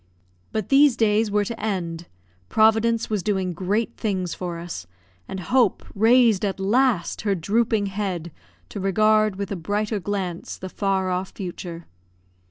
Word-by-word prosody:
But 215 -3 -3
these 275 -2 +5
days 215 -1 +2
were 205 0 +1
to 225 +2 -5
end; 175 -5 -3 0.4
Providence 225 +1 +3
was 210 -3 0
doing 190 -2 -1
great 200 +6 -1
things 190 -5 -2
for 175 -2 -5
us; 165 - -7 0.4
and 190 - -5
Hope 245 +2 +2
raised 225 -1 +4
at 195 -1 -1
last 210 -1 +1
her 205 -2 +1
drooping 215 +4 +1
head 190 -4 -3 0.4
to - - -6
regard 215 +2 +3
with 200 0 -5
a - - -1
brighter 205 +4 -2
glance 190 -3 -4
the 185 - -7
far 190 -1 0
off 185 +1 -2
future. 175 -3 -7
200 Hz, 150 wpm, -23 LUFS, 185-220 Hz, 0.4 s, these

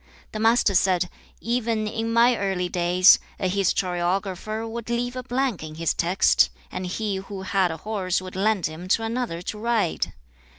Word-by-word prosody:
The 215 - -5
Master 225 -1 +3
said, 180 -1 +2 0.3
'Even 230 -2 -1
in 225 +1 -2
my 235 +2 +5
early 190 -4 -1
days, 180 +1 +5 0.2
a 190 - 0
historiographer 190 +3 -1
would 230 0 -6
leave 245 +1 -1
a 255 - -3
blank 255 -3 -1
in 155 0 -8
his 165 0 0
text, 180 +3 +3 0.2
and 185 - -4
he 200 +1 -2
who 195 0 -7
had 190 -1 +1
a 160 - -4
horse 190 -1 -1
would 185 0 -9
lend 200 -1 +1
him 160 +4 -5
to 225 +4 +2
another 225 -7 -3
to 210 - -5
ride. 220 - 0
195 Hz, 170 wpm, -24 LUFS, 180-225 Hz, 0.3 s, my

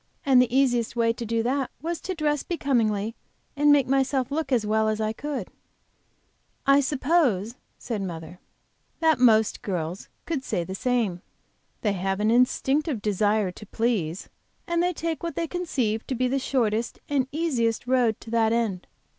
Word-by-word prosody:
And 260 -3 +6
the 250 +1 +1
easiest 245 -4 +2
way 230 -1 +2
to 230 0 -6
do 230 0 0
that 265 +2 0
was 335 +3 -4
to 375 - -4
dress 295 -2 0
becomingly 230 - 0 0.4
and 295 +1 +4
make 285 -3 +5
myself 270 0 +1
look 305 -1 -2
as 235 -4 +2
well 220 +1 +2
as 215 0 -1
I 215 0 -1
could." 275 -5 -5 1.2
"I 275 +1 +6
suppose," 265 - +1 0.2
said 225 -4 -4
mother, 170 -1 -6 0.6
"that 320 -4 +3
most 220 -3 +4
girls 175 -2 -4 0.2
could 305 -6 -2
say 175 - -1
the 190 - -6
same. 215 -5 0 0.6
They 210 -3 +1
have 195 +1 -2
an 215 +1 +2
instinctive 265 +3 +2
desire 210 -1 +1
to 210 - -12
please, 200 -8 -1 0.4
and 340 0 0
they 355 +1 +2
take 330 -1 -3
what 335 -1 -4
they 335 - -1
conceive 270 -11 -2
to 260 - -2
be 255 +1 +1
the 270 +2 0
shortest 235 -4 0
and 275 -3 +1
easiest 255 -8 0
road 245 -4 +2
to 225 - -10
that 225 -1 +3
end. 225 -6 -1
240 Hz, 170 wpm, -25 LUFS, 215-280 Hz, 1.2 s, And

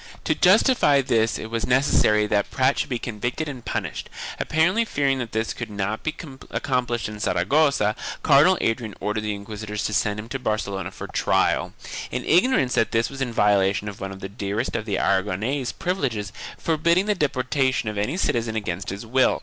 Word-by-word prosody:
To - - +2
justify 150 - +4
this 115 -3 +1
it 110 - -7
was 115 -1 -1
necessary 125 -5 +3
that 105 -1 0
Prat 130 +2 +2
should - - -1
be 125 - -1
convicted 120 +7 -3
and 130 -5 -7
punished. - - -4 0.3
Apparently 180 +9 +2
fearing 140 -10 0
that 120 -3 -4
this 110 +1 -1
could 120 - -6
not 105 +1 -3
be 155 - -1
accom 130 -3 -3
plished 120 -1 -2
in 105 0 -8
Saragossa, 110 - +2 0.3
Cardinal 155 +6 +6
Adrian 115 -2 -1
ordered 105 +2 -2
the 105 -1 -2
inquisitors 105 +1 -5
to 105 - -2
send 105 0 +1
him 110 - -7
to 135 - -3
Barcelona 105 -5 -2
for - - -8
trial, - - +1 0.4
in - - -4
ignorance 175 - +3
that 115 - +2
this 115 +3 0
was 135 0 -7
in 125 -3 -1
violation 105 -2 +2
of 100 -1 -7
one 95 0 -4
of 95 0 -10
the 95 - -4
dearest 100 +3 -3
of 110 - -2
the 105 -3 -1
Aragonese 105 +8 0
privileges 120 - -2 0.2
for 160 -1 0
bidding 170 +5 +3
the 210 - +2
deportation 130 - 0
of 105 -1 -2
any 130 - -1
citizen 115 - 0
against 95 -3 -3
his 100 +4 -6
will. 130 +3 +2
115 Hz, 190 wpm, -24 LUFS, 105-135 Hz, 0.4 s, Cardinal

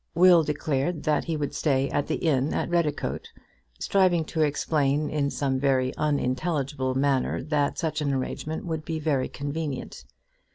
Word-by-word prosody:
Will 175 0 +7
declared 150 +1 -1
that 150 -2 +1
he 165 -2 -2
would 145 -2 -3
stay 135 -3 +1
at 145 - 0
the - - 0
inn 140 -4 +1
at - - -2
Redicote, 165 -4 -1 0.5
striving 180 -4 +2
to 160 +1 -2
explain 150 -1 +1
in 145 -2 0
some 135 -2 -1
very 130 -2 +1
unintelligible 140 -1 -1
manner 135 -1 +1
that 145 -1 0
such 160 -2 -2
an 145 -1 0
arrangement 140 +4 -3
would 160 -2 -3
be 160 +1 -3
very 150 -4 0
convenient. 145 - -5
150 Hz, 155 wpm, -26 LUFS, 135-160 Hz, 0.5 s, Will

